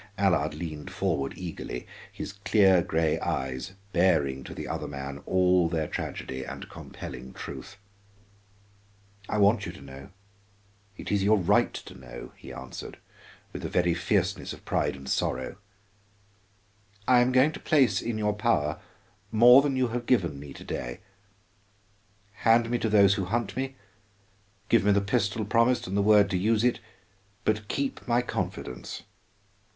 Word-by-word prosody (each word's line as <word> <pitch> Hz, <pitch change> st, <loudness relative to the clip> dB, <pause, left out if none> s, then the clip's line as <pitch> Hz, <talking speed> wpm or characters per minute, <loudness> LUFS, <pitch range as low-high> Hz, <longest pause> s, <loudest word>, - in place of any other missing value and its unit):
Allard 95 Hz, -2 st, +2 dB
leaned 75 Hz, -3 st, -6 dB
forward 70 Hz, 0 st, -1 dB
eagerly, 85 Hz, -8 st, -6 dB, 0.3 s
his 100 Hz, -, -6 dB
clear 100 Hz, -2 st, +4 dB
gray 80 Hz, -2 st, 0 dB
eyes 65 Hz, +6 st, -3 dB, 0.2 s
baring 80 Hz, -7 st, +2 dB
to -, -, -8 dB
the -, -, -6 dB
other -, -, -3 dB
man 70 Hz, 0 st, -6 dB
all 90 Hz, -2 st, +3 dB
their 80 Hz, -2 st, -1 dB
tragedy 65 Hz, 0 st, -5 dB
and -, -, -7 dB
compelling 65 Hz, 0 st, -9 dB
truth. 100 Hz, -, -8 dB, 1.5 s
"I 110 Hz, -, 0 dB
want 105 Hz, +3 st, +3 dB
you -, -, -4 dB
to -, -, -13 dB
know, 70 Hz, 0 st, -11 dB, 0.9 s
it -, -, -6 dB
is 100 Hz, -1 st, +2 dB
your 105 Hz, +2 st, +5 dB
right 90 Hz, -, +3 dB
to -, -, -9 dB
know," 65 Hz, -2 st, -10 dB
he -, -, -11 dB
answered, -, -, -8 dB, 0.6 s
with -, -, -6 dB
a -, -, -3 dB
very 90 Hz, -1 st, +2 dB
fierceness 95 Hz, +2 st, 0 dB
of -, -, -14 dB
pride -, -, 0 dB
and 65 Hz, 0 st, -11 dB
sorrow. 65 Hz, +8 st, -1 dB, 1.5 s
"I 125 Hz, -1 st, +6 dB
am 125 Hz, +1 st, +3 dB
going 130 Hz, +4 st, +5 dB
to -, -, -8 dB
place 145 Hz, -6 st, +3 dB
in 115 Hz, -1 st, -3 dB
your 105 Hz, -1 st, +1 dB
power 95 Hz, -9 st, 0 dB, 0.5 s
more 120 Hz, +4 st, +8 dB
than 140 Hz, -1 st, 0 dB
you 130 Hz, -2 st, +1 dB
have 120 Hz, +1 st, -4 dB
given 85 Hz, -, +2 dB
me 70 Hz, 0 st, -9 dB
to -, -, -11 dB
day. -, -, -5 dB, 1.4 s
Hand 115 Hz, 0 st, +4 dB
me 120 Hz, -, +1 dB
to 115 Hz, -, 0 dB
those 100 Hz, -2 st, +6 dB
who 100 Hz, -2 st, -2 dB
hunt 105 Hz, +1 st, -2 dB
me, 135 Hz, +1 st, -3 dB, 0.9 s
give 115 Hz, -, +4 dB
me 105 Hz, 0 st, +4 dB
the 100 Hz, -, +4 dB
pistol 105 Hz, 0 st, 0 dB
promised 115 Hz, +4 st, +2 dB
and 95 Hz, -, -4 dB
the 100 Hz, -, +3 dB
word 105 Hz, 0 st, +6 dB
to 90 Hz, -, +1 dB
use 110 Hz, +3 st, +2 dB
it, 125 Hz, 0 st, +2 dB, 0.7 s
but 105 Hz, -1 st, 0 dB
keep 140 Hz, +2 st, -3 dB
my 120 Hz, 0 st, +2 dB
confidence. 60 Hz, -, -5 dB
100 Hz, 155 wpm, -27 LUFS, 80-115 Hz, 1.5 s, more